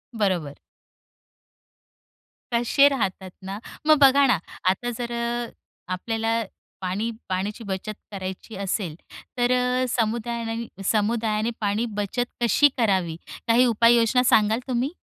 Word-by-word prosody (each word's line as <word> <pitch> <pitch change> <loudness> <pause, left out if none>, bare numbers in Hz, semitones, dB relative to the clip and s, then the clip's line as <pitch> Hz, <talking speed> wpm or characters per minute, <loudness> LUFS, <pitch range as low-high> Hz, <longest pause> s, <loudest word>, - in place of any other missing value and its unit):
बरोबर. 180 -9 -1 1.9
कसे 240 +4 +5
राहतात 190 -8 -2
ना, 195 +1 -5 0.3
मग 310 -1 +7
बघा 275 +1 +7
ना, 250 - +4 0.3
आता 195 +6 -1
जर 240 -1 -4
अ, 235 0 -2 0.4
आपल्याला 225 +4 -1 0.4
पाणी 190 +5 -2 0.2
पाण्याची 200 +5 -2
बचत 195 +2 -4 0.2
करायची 190 +2 -6
असेल, 195 -4 -2 0.4
तर 245 0 +2
अ, 250 0 +2
समुदायाने 230 0 -2 0.2
समुदायाने 220 0 0
पाणी 210 +3 0
बचत 210 +4 -1 0.2
कशी 290 +5 +5
करावी? 190 -8 +1 0.3
काही 235 +2 +5
उपाययोजना 235 +1 +4
सांगाल 220 -1 +4
तुम्ही? 255 +1 0
230 Hz, 110 wpm, -24 LUFS, 200-240 Hz, 1.9 s, मग